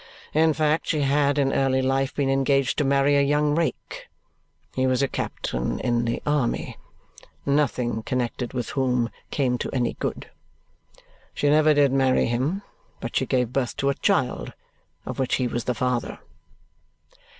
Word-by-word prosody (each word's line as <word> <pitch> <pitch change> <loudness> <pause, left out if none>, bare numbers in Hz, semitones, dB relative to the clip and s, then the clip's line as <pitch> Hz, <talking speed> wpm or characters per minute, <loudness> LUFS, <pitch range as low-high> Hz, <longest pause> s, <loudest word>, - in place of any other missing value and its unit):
In 160 +1 +4
fact, 155 +1 +1
she 155 - +1
had 140 +1 +2
in 135 -1 +2
early 130 -1 +2
life 135 +1 0
been 140 -2 0
engaged 135 +1 +1
to - - +3
marry 140 +1 +3
a 140 - +4
young 145 +1 +2
rake - - -3 0.7
he 130 0 +1
was 130 +1 +2
a - - +2
captain - - -3
in 120 -1 0
the 115 0 -2
army 145 -5 0 0.7
nothing 130 -5 0
connected 125 0 -2
with 125 -3 -3
whom 125 -3 0 0.2
came 125 -4 0
to - - -3
any 125 -2 0
good. - - -5 1.0
She 145 - +2
never 155 0 +5
did 145 -2 +4
marry 135 -1 +3
him, 135 +12 -1 0.4
but - - -6
she - - +1
gave 125 -2 0
birth 130 -3 -1
to 140 - +1
a - - +2
child - - 0 0.5
of - - -6
which 130 - +1
he 130 - 0
was 120 -1 -3
the 125 - -1
father." 125 +1 -1
135 Hz, 160 wpm, -24 LUFS, 125-145 Hz, 1.0 s, never